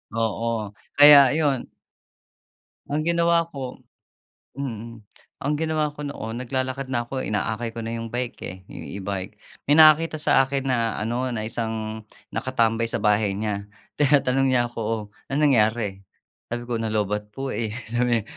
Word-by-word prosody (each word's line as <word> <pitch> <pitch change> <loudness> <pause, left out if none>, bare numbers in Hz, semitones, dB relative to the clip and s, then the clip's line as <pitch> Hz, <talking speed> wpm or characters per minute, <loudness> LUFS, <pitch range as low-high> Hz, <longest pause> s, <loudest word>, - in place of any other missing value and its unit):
Oo. 115 -1 -1 0.2
Kaya 145 -2 +9
iyon 145 -5 0 1.2
Ang 150 +2 -1
ginawa 170 0 +2
ko 130 -4 -7 0.8
mm. 115 -4 -6 0.4
Ang 145 +2 +1
ginawa 155 -1 0
ko 150 - -7
noon, 120 -5 -5
naglalakad 130 +1 -2
na 120 -2 0
'ko, 130 +1 -3
inaakay 110 +2 -2
ko - - -4
na 115 +1 -4
'yong 115 -1 -5
bike, 120 0 -3
eh, 90 - -7
'yong - - -8
e-bike. 95 +1 -4 0.4
May - - +7
nakakita 155 +1 +6
sa 135 - +4
akin 135 0 -2
na 115 -3 +1
ano, 120 +4 -1
na 110 -2 -3
isang 110 -2 -4 0.3
nakatambay 115 -1 +1
sa 115 - -1
bahay 105 -1 +2
niya. 105 -2 -2 0.4
Tinatanong 135 -2 +3
niya 120 -1 +3
ako, 120 - -8
"Oh, 110 0 -1 0.3
anong 150 +2 +3
nangyari?" 105 -4 +1 0.5
Sabi 120 0 -3
ko, 120 - 0
"Na 115 -1 -2
low-batt 105 0 -1
po, 135 +2 -4
eh." 110 -2 -2 0.2
Sabi 120 -2 +1
120 Hz, 155 wpm, -24 LUFS, 110-135 Hz, 1.2 s, Kaya